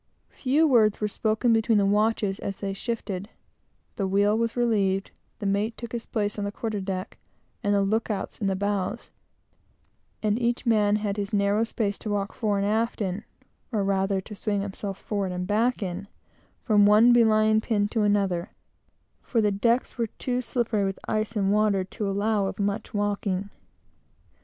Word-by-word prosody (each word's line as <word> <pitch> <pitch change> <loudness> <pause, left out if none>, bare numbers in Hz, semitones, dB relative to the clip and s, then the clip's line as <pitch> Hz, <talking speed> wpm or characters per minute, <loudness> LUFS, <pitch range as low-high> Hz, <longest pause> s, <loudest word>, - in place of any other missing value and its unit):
Few 295 +5 +2
words 220 -6 +4
were 210 - 0
spoken 220 +3 +1
between 225 0 +3
the 200 - +3
watches 205 -1 +1
as 195 - -5
they 195 -1 -3
shifted, 205 -2 -4 0.7
the 195 - 0
wheel 200 +2 +3
was 230 +1 -1
relieved, 200 -5 +1 0.3
the - - -6
mate 205 +3 0
took 235 -1 -7
his 235 -1 -5
place 210 -2 -2
on - - -2
the 200 - -2
quarter 215 -1 -3
deck, 190 -1 -5 0.4
the 205 -2 +2
look 220 +4 0
outs 200 -3 -4
in 200 - +1
the 195 - +1
bows; 200 +2 -2 1.1
and 210 +2 +1
each 240 +2 0
man 210 -3 +3
had 210 -1 -2
his 200 0 -3
narrow 200 +2 +2
space 215 -3 -2
to 215 - -5
walk 200 -1 -1
fore 210 -4 0
and 200 - 0
aft 225 +3 0
in, 195 0 -2 0.5
or, 210 -4 0
rather, 195 0 +1
to 210 - -10
swing 205 0 -1
himself 195 0 -5
forward 200 -3 -2
and 180 0 -3
back 225 +4 +1
in, 190 +2 -5 0.6
from 210 -3 +5
one 220 +4 +7
belaying 220 -2 +4
pin 210 -3 +1
to 225 - 0
another, 200 -3 +1 0.7
for 235 - -1
the 210 -2 +3
decks 235 +5 0
were 230 - +1
too 250 +3 -3
slippery 235 -4 -1
with 195 -1 -2
ice 215 +1 -1
and 200 -1 +2
water 210 -2 +2
to 200 +2 -4
allow 200 0 +1
of - - -5
much 205 +1 -2
walking. 205 -1 -1
205 Hz, 175 wpm, -26 LUFS, 200-225 Hz, 1.1 s, one